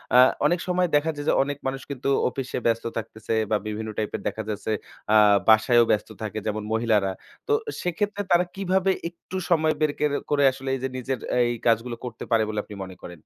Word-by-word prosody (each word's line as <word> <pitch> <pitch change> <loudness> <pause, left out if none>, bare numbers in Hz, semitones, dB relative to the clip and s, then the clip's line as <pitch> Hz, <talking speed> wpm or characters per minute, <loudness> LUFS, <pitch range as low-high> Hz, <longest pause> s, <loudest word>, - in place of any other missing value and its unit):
আ - - +9 0.3
অনেক 175 +3 +3
সময় 180 0 +2
দেখা 150 +2 +2
যায় 145 0 -6
যে - - +4
অনেক 145 0 -4
মানুষ 135 0 -3
কিন্তু 135 0 -2 0.2
অফিসে 130 0 -4
ব্যস্ত 115 0 +1
থাকতেছে, 110 0 -4 0.2
বা 105 - +4
বিভিন্ন 110 +1 -4
টাইপের 105 -1 -2
দেখা 110 - -3
যাচ্ছে। 105 +1 -3 0.4
আ - - +6 0.3
বাসায়ও 115 +2 +6
ব্যস্ত 105 - 0
থাকে 110 0 -3
যেমন 105 0 -2
মহিলারা। 110 -4 +2 0.4
তো 440 - +2 0.3
সেক্ষেত্রে 205 +4 -1
তারা 175 +1 +5
কিভাবে 190 0 +1 0.2
একটু 175 +2 -12
সময় 160 -2 +3
বের 155 -1 +3
কের 150 -1 +2 0.2
করে 145 -1 +3
আসলে 135 +1 -6
এই - - -5
যে - - +1
নিজের 130 -1 -3 0.2
এই 120 - +1 0.2
কাজগুলো 115 +1 +2
করতে 115 -2 -7
পারে 115 -1 +4
বলে 105 -1 -2
আপনি 105 - -10
মনে 95 -1 -9
করেন? 90 -2 -9
125 Hz, 200 wpm, -25 LUFS, 110-155 Hz, 0.4 s, আ